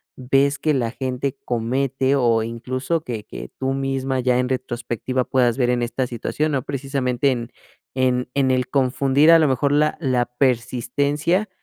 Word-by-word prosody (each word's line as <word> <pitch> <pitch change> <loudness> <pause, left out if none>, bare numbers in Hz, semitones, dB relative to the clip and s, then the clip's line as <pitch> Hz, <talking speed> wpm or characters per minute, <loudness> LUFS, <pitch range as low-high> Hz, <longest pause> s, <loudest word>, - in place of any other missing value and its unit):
ves 135 +2 +1
que 155 - +1
la 120 -4 0
gente 130 +1 -3
comete 130 +3 0
o 120 -4 +2
incluso 130 +7 -3
que 115 -6 -5
que - - -8
tú 135 0 0
misma, 135 -1 -1
ya 125 0 +2
en 125 - 0
retrospectiva, 125 0 -2
puedas 125 -2 +2
ver 125 -2 +1
en 125 -1 0
esta 125 +2 -2
situación?, 150 +5 -2
no 135 - +1
precisamente, 135 -1 -1
en 120 -2 -4 0.4
en 125 -1 +1
en 135 -2 +2
el 130 0 0
confundir, 135 +2 +3
a 165 0 +8
lo 155 -3 +3
mejor 140 +2 +1
la 150 +1 +2
la 130 -5 +1
persistencia 140 - 0
130 Hz, 165 wpm, -21 LUFS, 125-140 Hz, 0.4 s, a